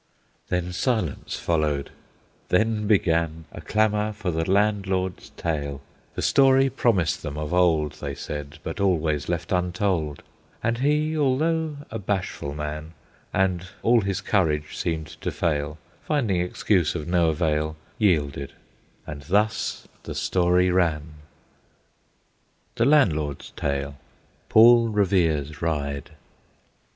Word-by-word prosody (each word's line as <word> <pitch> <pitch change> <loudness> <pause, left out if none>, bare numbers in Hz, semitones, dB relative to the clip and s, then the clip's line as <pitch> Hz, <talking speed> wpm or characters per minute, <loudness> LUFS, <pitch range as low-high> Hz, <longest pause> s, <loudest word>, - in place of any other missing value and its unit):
Then 90 0 -1
silence 95 - -1
followed; 75 -4 0 0.6
then 105 +2 +1
began 80 -5 +1
A - - -9
clamor 105 0 +1
for 100 -4 -3
the 80 +2 -2
Landlord's 95 -3 0
tale, 70 -4 -2 0.4
The - - -3
story 135 -1 +4
promised 105 - +1
them 75 -2 -5
of 75 +1 -3
old, 80 -5 +3
They - - -6
said, 75 0 -6
but 80 - -5
always 80 -6 +1
left 85 -1 -2
untold; 90 -4 -1 0.4
And 115 +1 0
he, 150 +3 +1
although 155 +2 +1
a 110 - -4
bashful 95 -7 -3
man, 75 +2 -5 0.4
And 95 -1 0 0.2
all 115 0 +5
his 100 -2 -2
courage 75 -7 0
seemed 80 -2 -2 0.2
to - - -1
fail, 75 -2 -1 0.2
Finding 115 - 0
excuse 90 -1 +1
of 75 - -4
no 85 -2 +3
avail, 75 -1 0 0.2
Yielded; 75 -9 +1 0.5
and 70 -1 -7
thus 105 +8 0
the - - -7
story 90 0 +2
ran. 80 -4 0 1.6
THE 115 - +1
LANDLORD'S 80 - +2
TALE. 70 0 -3 0.5
PAUL 115 +1 +7
REVERE'S 85 -9 +1
RIDE. 70 -4 -2
90 Hz, 120 wpm, -24 LUFS, 75-105 Hz, 1.6 s, PAUL